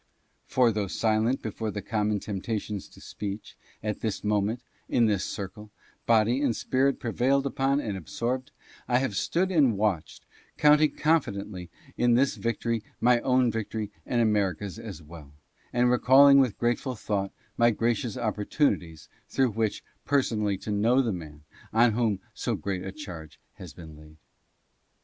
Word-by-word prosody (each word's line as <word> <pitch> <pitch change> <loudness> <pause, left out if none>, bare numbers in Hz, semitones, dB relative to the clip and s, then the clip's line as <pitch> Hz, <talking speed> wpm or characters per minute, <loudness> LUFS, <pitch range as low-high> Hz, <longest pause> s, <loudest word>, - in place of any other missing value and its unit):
For 125 -3 +3
though 105 -2 -2
silent 110 +6 0
before 110 0 -3
the 105 -1 -5
common 105 -1 0
temptations 105 0 -4
to - - -17
speech, 100 0 -7 0.3
at 105 -1 -2
this 110 -3 -3
moment, 105 +3 0 0.3
in 120 - +3
this 105 -4 +1
circle, 105 +2 -6 0.4
body 115 +3 +3
and 130 -6 +1
spirit 135 +5 +1
prevailed 135 +3 +1
upon 135 +1 +1
and 110 -8 -3
absorbed, 120 - -3 0.4
I 120 - +3
have 130 -6 -1
stood 185 - 0
and 140 - +3
watched, 100 -6 -2 0.3
counting 150 +1 +5
confidently 100 - -1 0.3
in 120 -1 +3
this 135 +2 +3
victory 115 -1 -2 0.2
my 120 0 +4
own 125 -1 +2
victory 110 -1 -4
and 120 - -1
America's 105 -2 0
as 100 -8 -8
well, 75 -2 -13 0.4
and 125 0 +3
recalling 135 +3 +7
with 130 -6 +2
grateful 120 +2 -1
thought 100 -3 -2 0.2
my 120 0 +4
gracious 115 0 -1
opportunities 105 - -1 0.2
through 130 -3 +1
which 110 0 -2 0.2
per 140 -1 +2
sonally 105 -5 -1
to 105 - -4
know 115 +6 +3
the 115 -4 -1
man 75 -4 -9 0.3
on 115 +1 +4
whom 110 -3 0
so - - -2
great 95 -2 -4
a 95 - -5
charge 85 - -9
had 90 -6 -11
been 80 -3 -11
laid. 75 +1 -16
110 Hz, 155 wpm, -27 LUFS, 100-125 Hz, 0.4 s, recalling